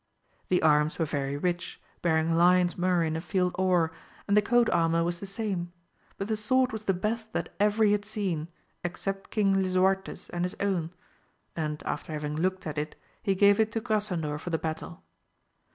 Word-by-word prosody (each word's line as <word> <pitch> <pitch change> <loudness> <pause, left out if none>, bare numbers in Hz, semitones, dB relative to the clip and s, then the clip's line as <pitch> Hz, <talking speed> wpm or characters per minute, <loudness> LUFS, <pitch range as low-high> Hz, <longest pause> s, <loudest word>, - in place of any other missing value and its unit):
The 180 -2 +2
arms 150 0 +3
were 165 - +1
very 140 -1 -2
rich, 175 +3 -2 0.2
bearing 160 -1 +2
lions 175 +1 +4
murrey 180 -1 +2
in 160 0 -1
a 160 - -2
field 180 +1 0
or, 180 -3 +2 0.4
and 200 - +3
the 210 - +6
coat 240 +2 +3
armour 165 0 +2
was 175 0 -2
the 200 - -6
same, 195 -4 -3 0.5
but 195 - -3
the 220 - 0
sword 255 +4 +2
was 220 -1 -6
the 195 - +3
best 220 +4 -3
that - - -2
ever 210 +2 +3
he 210 - +5
had 205 0 +1
seen, 195 -7 -2 0.4
except 195 +2 -4
King 200 -3 +2
Lisuarte's 190 +1 +1
and 175 0 -2
his 180 - -2
own, 185 -5 0 0.7
and 155 -2 -3
after 160 - -3
having 150 0 -3
looked 185 +3 -1
at 155 -2 -3
it 150 +1 -4 0.3
he 195 -3 +1
gave 200 +2 +5
it 220 0 +3
to 225 - 0
Grasandor 185 -9 -1
for 175 - -6
the 165 - +1
battle. 160 +2 -5
180 Hz, 190 wpm, -28 LUFS, 165-205 Hz, 0.7 s, the